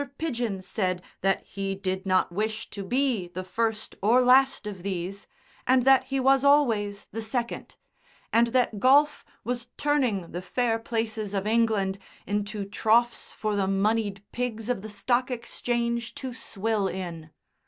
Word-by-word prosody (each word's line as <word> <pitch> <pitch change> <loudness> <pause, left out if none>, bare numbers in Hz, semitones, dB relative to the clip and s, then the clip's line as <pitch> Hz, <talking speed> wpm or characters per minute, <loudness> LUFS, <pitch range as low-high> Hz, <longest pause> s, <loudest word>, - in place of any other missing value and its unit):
Pidgen 235 -11 -2
said 185 -3 -1 0.2
that 195 0 +1
he 195 0 -4
did 190 0 -3
not 185 -2 +2
wish 215 +4 -3
to 200 - -5
be 245 -3 0
the 180 +1 -6
first 220 +3 -2
or 225 +5 +5
last 260 0 +4
of 200 -4 -6
these, 190 +1 -4 0.4
and 255 -1 +4
that 270 -1 +6
he 270 0 -1
was 270 +1 +4
always 225 -8 +3
the 225 - -4
second, 235 +2 -3 0.6
and 235 +1 +5
that 235 -3 +1
golf 285 +5 +4 0.2
was 245 +1 -3
turning 255 -12 +1
the 175 - -4
fair 225 +4 0
places 225 -3 -3
of 195 0 -1
England 215 -3 +1 0.3
into 205 0 -2
troughs 230 +4 +1
for 215 -1 -2
the 195 -1 +1
moneyed 200 0 0
pigs 235 -2 -3
of 245 -6 0
the 215 - -7
Stock 240 +5 0
Exchange 235 -1 -2
to 260 -2 -5
swill 215 -3 -1
in. 170 -4 -6
220 Hz, 155 wpm, -27 LUFS, 195-245 Hz, 0.6 s, that